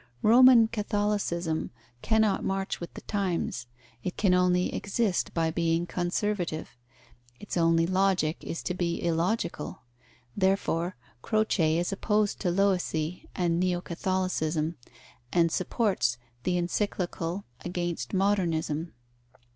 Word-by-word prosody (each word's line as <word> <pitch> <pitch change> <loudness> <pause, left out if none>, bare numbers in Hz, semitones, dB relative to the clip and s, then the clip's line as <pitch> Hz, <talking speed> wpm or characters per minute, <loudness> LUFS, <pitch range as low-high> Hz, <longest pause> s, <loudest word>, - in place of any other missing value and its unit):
Roman 240 0 +8
Catholicism 205 -7 -1 0.3
cannot 220 -2 +2
march 195 0 -2
with 170 - -7
the - - -7
times. 180 - -2 0.4
It 180 - -4
can 195 -3 +3
only 180 0 +2
exist 200 -1 0
by 165 -1 +1
being 165 0 +1
conservative 175 -1 -2 0.6
its 205 - -6
only 165 -1 +3
Logic 185 -3 +2
is 165 - -5
to - - -1
be 175 -1 -1
illogical. 170 -1 -1 0.5
Therefore, 190 -2 +1 0.3
Croce 195 - +2
is 175 +3 0
opposed 210 +1 +1
to 180 - 0
Loisy 180 -3 0
and 170 -2 +1
Neo 180 -1 +1
Catholicism, 170 -3 -1 0.6
and 170 -1 +3
supports 185 - 0 0.3
the 180 -1 +1
Encyclical 175 0 -2 0.2
against 175 -8 -3
Modernism. 170 -5 0
180 Hz, 110 wpm, -28 LUFS, 165-200 Hz, 0.6 s, Roman